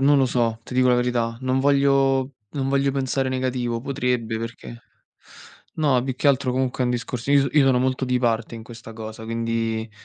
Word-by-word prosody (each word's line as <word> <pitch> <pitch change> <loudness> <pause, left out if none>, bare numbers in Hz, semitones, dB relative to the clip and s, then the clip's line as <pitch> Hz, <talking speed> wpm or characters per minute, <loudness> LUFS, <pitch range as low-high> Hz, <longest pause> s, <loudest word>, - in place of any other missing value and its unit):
non 145 +2 +5
lo 135 -1 +4
so, 115 -2 0
ti 125 - -9
dico 130 0 +4
la 125 - +5
verità. 120 -2 0
Non 130 0 0
voglio 135 -1 +2 0.2
non 135 -2 -2
voglio 140 0 +1
pensare 135 -1 -1
negativo, 125 -2 -1
potrebbe 125 -4 -1
perché 115 +1 -8 0.9
no 140 -6 +2
più 130 0 -3
che 140 +3 +1
altro 130 -2 +2
comunque 130 0 -1
è - - +2
un 125 - 0
discorso 125 +1 -3
io 140 -1 +4
io 150 0 +4
sono 130 -2 +4
molto 130 +1 0
di 125 -1 +1
parte 115 -2 -1
in 115 - -8
questa 115 0 -11
cosa, 110 0 -8
quindi 115 -1 -2
125 Hz, 195 wpm, -23 LUFS, 115-135 Hz, 0.9 s, non